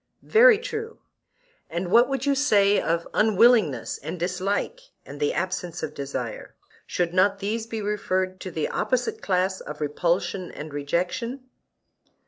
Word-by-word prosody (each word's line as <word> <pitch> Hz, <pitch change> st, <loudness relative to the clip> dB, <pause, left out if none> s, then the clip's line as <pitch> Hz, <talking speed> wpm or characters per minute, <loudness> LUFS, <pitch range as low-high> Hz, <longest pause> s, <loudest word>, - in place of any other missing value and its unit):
Very 460 Hz, 0 st, +6 dB
true. 455 Hz, -1 st, -5 dB, 0.7 s
And 175 Hz, +2 st, -3 dB
what 240 Hz, +4 st, +6 dB
would 270 Hz, -1 st, -2 dB
you 280 Hz, -, +3 dB
say 205 Hz, -8 st, +3 dB
of 170 Hz, +1 st, -1 dB
unwillingness 215 Hz, -, +3 dB
and 180 Hz, -, -6 dB
dislike 190 Hz, -, -2 dB, 0.3 s
and 145 Hz, +1 st, -10 dB
the 145 Hz, -, +1 dB
absence 180 Hz, -2 st, -3 dB
of 150 Hz, -, -4 dB
desire; 140 Hz, -1 st, -5 dB, 0.3 s
should 175 Hz, -1 st, -1 dB
not 195 Hz, +2 st, +3 dB
these 215 Hz, +3 st, -3 dB
be 225 Hz, -2 st, -4 dB
referred 185 Hz, -2 st, -1 dB
to 185 Hz, -, -6 dB
the 160 Hz, -3 st, -2 dB
opposite 420 Hz, -, -1 dB
class 185 Hz, 0 st, 0 dB
of 150 Hz, 0 st, -8 dB
repulsion 170 Hz, +4 st, -1 dB
and 150 Hz, 0 st, -8 dB
rejection? 185 Hz, -, -2 dB
190 Hz, 140 wpm, -25 LUFS, 170-235 Hz, 0.7 s, Very